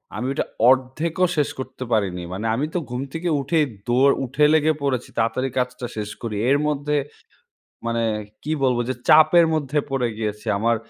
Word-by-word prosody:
আমি 120 +4 -3
ওটা - - -1 0.2
১/২ 130 +5 +1
ও - - +7
শেষ 145 - +2
করতে 130 - -6
পারিনি। 90 -5 0
মানে 105 +4 -4
আমি 140 +6 0
তো 180 - +2
ঘুম 125 +1 -3
থেকে 170 +1 -2
উঠেই 150 +2 +2 0.2
দৌড় 130 +3 +4
উঠে 140 +4 +2
লেগে 155 0 +3
পড়েছি, 130 -3 -1
তাড়াতাড়ি 115 +4 0
কাজটা 125 0 -2
শেষ 105 -1 -3
করি। 115 -3 -4
এর 140 - +5
মধ্যে 150 0 0 0.9
মানে 115 0 0 0.4
কি 155 - -3
বলবো 125 -2 +2
যে 130 - -1
চাপের 160 +2 +7
মধ্যে 150 -1 -1
পড়ে 130 -3 0
গিয়েছি। 105 0 -4
আমার 115 +2 +2
130 Hz, 175 wpm, -22 LUFS, 115-150 Hz, 0.9 s, ও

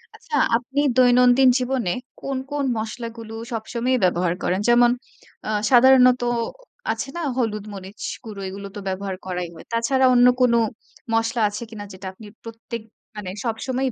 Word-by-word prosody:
আচ্ছা, 475 - -6 0.2
আপনি 270 +4 -2 0.2
দৈনন্দিন 250 +1 +6
জীবনে 250 -6 -1 0.3
কোন, 275 -1 -3
কোন 290 -1 -1
মসলাগুলো 225 0 -6 0.2
সবসময়ই 235 +3 -1
ব্যবহার 175 -1 +2
করেন? 185 +2 +1
যেমন 240 0 +6 0.6
আ - - -2 0.2
সাধারণত 255 0 +6 0.7
আছে 270 - -4
না? 345 - -3 0.2
হলুদ, 215 -4 -1
মরিচ 195 +1 -10 0.2
গুঁড়ো 210 -4 -8
এগুলো 200 +1 -7
তো - - -5
ব্যবহার 190 0 -3
করাই 180 -2 -3
হয়। 160 - -13
তাছাড়া 260 +3 +2
অন্য 245 0 +6
কোন 245 -2 +5 0.6
মশলা 225 +1 +1
আছে 210 +3 -6
কিনা 210 -2 -8
যেটা 185 +1 -8
আপনি 210 +2 -13 0.2
প্রত্যেক 230 0 -7 0.3
মানে 205 -3 -6 0.2
সবসময়ই 255 +3 -1
230 Hz, 145 wpm, -23 LUFS, 205-250 Hz, 0.7 s, দৈনন্দিন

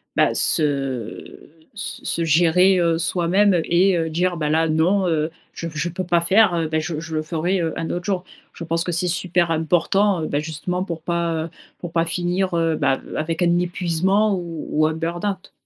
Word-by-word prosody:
bah, - - +3
se 135 -8 -1 0.2
se 205 - -7
se 165 - -1
gérer, 175 +4 +4
heu, 170 -1 +2
soi-même 180 +2 +2
et 175 -2 +2
dire: 175 +2 0
«Bah, 150 -2 -1
là, 160 +1 +2
non. 180 +5 +2
Heu, 155 -1 0 0.2
je 165 - -5
p 165 - -9
je 165 +3 -1
peux 185 +2 -4
pas 170 0 +2
faire, 190 +3 +4
heu, 165 -1 0
bah, 160 - 0
je 155 0 -4
je 160 -1 -6
le 155 - 0
ferai, 170 +4 -1
heu, 165 -1 -1
un 165 - -3
autre 175 0 -3
jour». 190 -3 -1 0.3
Je - - -8
pense 165 +1 -1
que 175 - -2
c'est 180 +2 0
super 175 -1 0
important, 170 +3 +1
bah, 145 - -1
justement, 160 +4 -3
pour 165 -3 -5
pas, 170 0 -1
heu, - - -8 0.3
pour 175 - -7
pas 165 0 +1
finir, 180 +2 -1
heu, 165 -2 +1
bah, 135 - +1 0.2
avec 160 +2 -2
un 175 0 +3
épuisement 180 +4 +1
ou 165 -3 -6
ou 155 +1 +3
un 160 - -1
burn-out. 175 +4 -3
170 Hz, 200 wpm, -21 LUFS, 160-180 Hz, 0.3 s, gérer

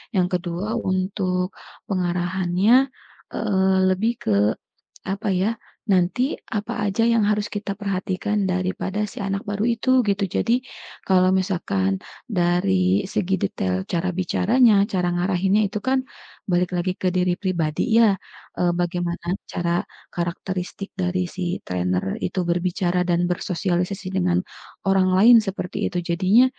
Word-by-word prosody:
yang 180 -2 +3
kedua 180 +2 -2
untuk 185 -1 -1 0.4
pengarahannya, 185 +6 +2 0.5
eee, 190 -3 +2
lebih 215 +5 +1
ke 105 - +2 0.7
apa 195 +2 -3
ya, 190 +5 +1 0.4
nanti 195 - +1
apa 210 -1 -3
aja 205 +4 +1
yang 230 -2 +3
harus 210 0 0
kita 205 -1 -4
perhatikan 195 0 -1
daripada 185 +2 -1
si 210 - -6
anak 195 0 -2
baru 205 +2 -1
itu, 255 +3 +3
gitu. 200 0 +1
Jadi 245 +2 +1 0.4
kalau 185 0 +4
misalkan 100 - 0 0.3
dari 185 +1 +2
segi 190 0 -1
detail 95 0 -1
cara 175 - -1
bicaranya, 205 +3 +3
cara 180 -2 0
ngarahinnya, 190 +3 +2
itu 210 - -4
kan 260 0 +2 0.5
balik 180 +1 +2
lagi 180 +1 0
ke 185 - -2
diri 180 -1 +2
pribadi 170 -6 -1 0.2
ya, 215 -4 +5 0.4
e - - +1
bagaimana 175 -1 -2 0.2
cara 175 0 0 0.3
karakteristik 180 +2 -4
dari 180 -1 -1
si 180 0 -3
trainer 90 0 -1 0.2
itu 185 +1 -2
berbicara 180 +1 0
dan 175 0 +2
bersosialisasi 180 +2 -2
dengan 180 -1 +2 0.5
orang 190 -1 +4
lain 235 +5 +8
seperti 185 -2 -2
itu. 180 - -1
Jadinya 185 +8 +4
185 Hz, 130 wpm, -23 LUFS, 175-200 Hz, 0.7 s, lain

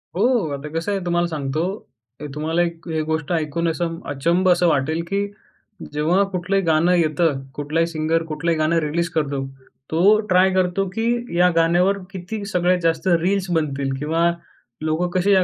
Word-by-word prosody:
हो, 190 - +1 0.3
आता 140 +2 -6
कसंय 195 +4 -1
तुम्हाला 175 0 +1
सांगतो, 155 -1 -2 0.6
ते 150 - -6
तुम्हाला 160 +3 0
एक 170 -1 -3
ए 155 - +1
गोष्ट 160 0 -2
ऐकून 165 0 -1
असं 165 0 -2
अचंब 170 +7 +1
असं 175 0 +4
वाटेल 155 +1 +1
की 200 +2 0 0.7
जेव्हा 165 +6 +2
कुठलंही 195 +1 0
गाणं 165 +2 +3
येतं, 155 -3 +1
कुठलाही 155 +3 0
सिंगर 165 0 0
कुठलंही 160 +2 -1
गाणं 155 +2 +2
रिलीज 170 +3 -1
करतो, 145 -4 -1 0.5
तो 195 +7 +5
ट्राय 185 +1 +5
करतो 185 +1 +1
की, 235 -2 -1
या 180 +1 +5
गाण्यावर 175 +4 +3
किती 195 +3 -6
सगळ्यात 180 -3 +1
जास्त 165 +2 0
रील्स 190 +1 0
बनतील 140 -4 -1
किंवा 165 +4 +1 0.5
लोकं 160 +3 0
कशी 200 +3 +2
या 190 -1 +5
170 Hz, 160 wpm, -21 LUFS, 155-180 Hz, 0.7 s, तो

